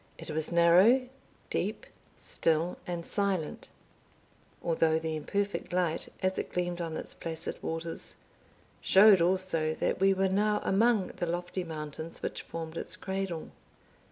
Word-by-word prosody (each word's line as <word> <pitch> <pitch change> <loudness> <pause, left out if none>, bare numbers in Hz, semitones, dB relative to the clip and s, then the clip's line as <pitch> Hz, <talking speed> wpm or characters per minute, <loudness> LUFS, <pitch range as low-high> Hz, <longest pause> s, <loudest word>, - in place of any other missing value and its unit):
It - - -6
was 155 +1 -2
narrow, 185 +10 +6 0.4
deep, - - -2 0.3
still, 165 +2 0
and 170 -1 -3
silent; 195 -6 -1 0.9
although 160 -1 +2
the 160 0 -2
imperfect 200 +6 -2
light, 175 -3 0
as 185 0 +1
it - - -4
gleamed 175 -1 -1
on 165 -2 -3
its - - -6
placid 165 0 -5
waters, 165 0 -4 0.7
showed 195 -1 +7
also 170 -3 +1
that - - -1
we 195 +1 +5
were 190 0 +2
now 210 +2 +2
among 215 -1 +3
the 175 - -1
lofty 175 +2 -2
mountains 160 0 -7
which - - -3
formed 165 0 -6
its - - -4
cradle. 190 -4 -4
175 Hz, 135 wpm, -30 LUFS, 165-195 Hz, 0.9 s, showed